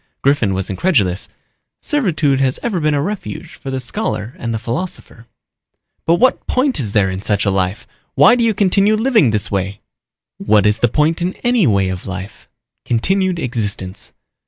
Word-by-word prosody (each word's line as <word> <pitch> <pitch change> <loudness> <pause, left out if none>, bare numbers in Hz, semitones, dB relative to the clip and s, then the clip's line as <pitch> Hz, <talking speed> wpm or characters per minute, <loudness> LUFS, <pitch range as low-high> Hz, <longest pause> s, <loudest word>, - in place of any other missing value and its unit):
Griffin 125 -9 +2
was 95 0 -2
incredulous. 100 - 0 0.5
"Servitude 160 - +1
has 130 -1 +1
ever 215 -7 -1
been 150 -1 +1
a 140 - +1
refuge 175 -4 -5
for 135 - -8
the 130 0 -2
scholar 125 - -3
and 115 - -3
the 115 - -1
philosopher." 120 -1 -5 0.8
"But 165 - +5
what 250 +8 +2
point 260 - +1
is 105 -6 -3
there 95 -3 +2
in 95 +1 -5
such 105 0 0
a 100 - +2
life? 95 +1 -1 0.3
Why 240 - +7
do 245 -1 +2
you 225 -2 +2
continue 200 +1 +3
living 220 - +3
this 105 -1 -2
way?" 100 0 -2 0.6
"What 105 -1 +3
is 105 +1 +3
the 120 - +3
point 155 +7 +1
in 180 +2 -1
any 240 - +3
way 100 -4 +2
of 95 +1 -5
life? 95 +1 -8 0.3
Continued 185 +10 0
existence. 105 - -3
130 Hz, 175 wpm, -17 LUFS, -, 0.8 s, Why